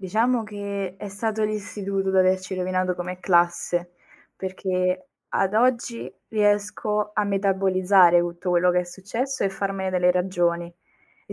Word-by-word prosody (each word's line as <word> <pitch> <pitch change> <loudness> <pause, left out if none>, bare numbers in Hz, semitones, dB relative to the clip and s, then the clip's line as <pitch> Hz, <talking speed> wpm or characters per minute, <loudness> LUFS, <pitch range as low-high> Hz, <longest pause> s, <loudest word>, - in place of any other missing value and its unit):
Diciamo 225 +5 +1
che 200 -3 -5
è 205 - -6
stato 215 +2 -2
l'istituto 200 -2 -3
ad 190 - +1
averci 185 0 +2
rovinato 185 0 -1
come 180 +1 -5
classe, 175 0 +1 0.4
perché, 185 +1 -2 0.2
ad 195 +1 0
oggi, 235 0 +1 0.2
riesco 210 0 0
a 210 - +2
metabolizzare 190 -2 +4
tutto 175 +1 -2
quello 180 0 +3
che 180 - +3
è - - -4
successo 205 +9 -3
e 195 - +1
farmene 195 -1 -3
delle 180 -1 +3
ragioni. 175 -1 0 0.5
E - - -8
190 Hz, 140 wpm, -24 LUFS, 180-205 Hz, 0.5 s, metabolizzare